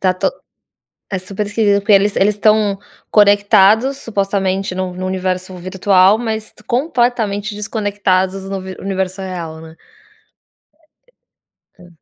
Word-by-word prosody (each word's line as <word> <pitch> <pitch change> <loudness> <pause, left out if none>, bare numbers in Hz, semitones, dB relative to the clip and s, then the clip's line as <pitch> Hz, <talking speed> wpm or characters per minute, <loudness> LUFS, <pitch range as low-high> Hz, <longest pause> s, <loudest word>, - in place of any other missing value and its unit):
tá 185 -1 +2
to 185 - 0 0.8
é 190 - -2
super 195 +3 -4
esquisito, 205 -1 +1
porque 205 +1 +1
eles 200 +1 +4
eles 205 +2 +3
estão 210 -1 +2 0.3
conectados, 205 +5 +4
supostamente, 195 -3 -2
num 185 -1 -3
num 185 +1 -4
universo 185 0 -3
virtual, 185 +2 +3
mas 220 -2 -4
completamente 240 -6 0
desconectados 200 -3 -1
do 195 - -3
un 190 0 -7
universo 190 0 -3
real, 170 -4 -6
né. 160 0 -13 2.0
É, 180 -1 -16
195 Hz, 120 wpm, -17 LUFS, 185-210 Hz, 2.0 s, eles